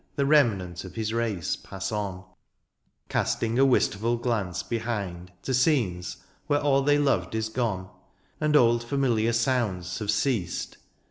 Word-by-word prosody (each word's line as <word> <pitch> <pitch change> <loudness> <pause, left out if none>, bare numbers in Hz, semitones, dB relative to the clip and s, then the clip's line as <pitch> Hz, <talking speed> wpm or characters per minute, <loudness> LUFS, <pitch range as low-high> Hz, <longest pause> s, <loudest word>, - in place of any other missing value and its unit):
The 140 - +1
remnant 105 - +2
of 95 - -10
his 110 -1 -2
race 110 -8 -1
pass 95 +1 -6
on, 100 -3 -3 0.8
Castmg 115 +2 0
a 135 - +6
wistful 115 -2 +2
glance 110 -7 -1
behind 100 -7 -4
To 130 - -2
scenes 120 - +1 0.3
where 145 -1 +2
all 140 -1 +3
they 145 +1 +3
loved 140 -5 +1
is 110 0 -1
gone. 110 -6 -2 0.5
And 150 0 +1
old 120 -3 +5
familiar 120 -3 +1
sounds 115 -7 0
have 105 -2 -4
ceased. 105 -4 -1
115 Hz, 140 wpm, -26 LUFS, 95-130 Hz, 0.8 s, a